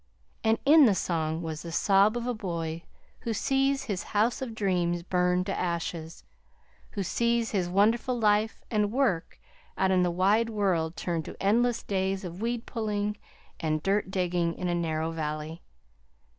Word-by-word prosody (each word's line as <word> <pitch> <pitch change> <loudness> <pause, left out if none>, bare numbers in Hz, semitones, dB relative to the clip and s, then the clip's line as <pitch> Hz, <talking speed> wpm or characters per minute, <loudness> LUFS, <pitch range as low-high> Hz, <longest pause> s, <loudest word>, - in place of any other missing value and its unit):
And 225 0 +3
in 300 +1 +8
the 205 - +3
song 160 -2 -1
was 160 -1 -4
the 170 - -7
sob 200 +6 +3
of 240 - -3
a 245 - 0
boy 170 -6 -4 0.4
who 230 -1 -3
sees 270 +2 +1
his 200 -7 -3 0.2
house 230 +5 +2
of 240 -4 -5
dreams 175 -4 0
burn 180 0 +1
to - - -3
ashes; 170 -2 -3 0.7
who 200 - -2
sees 235 +4 0
his 185 -4 0
wonderful 225 +6 +2
life 215 0 +2
and 210 -2 +1
work 230 -10 0 0.4
out 190 0 +2
in 185 -1 +4
the 180 - +2
wide 200 +6 +2
world 180 -7 0
turn 170 -2 -2
to - - -9
endless 235 +4 +2
days 190 0 -1
of 175 +2 -7
weed 235 0 -2
pulling 210 -2 -2 0.4
and 155 -1 -1
dirt 200 0 +1
digging 175 -3 0
in 180 - -3
a 175 - 0
narrow 160 -1 -1
valley. 155 +1 -4
190 Hz, 165 wpm, -28 LUFS, 170-220 Hz, 0.7 s, in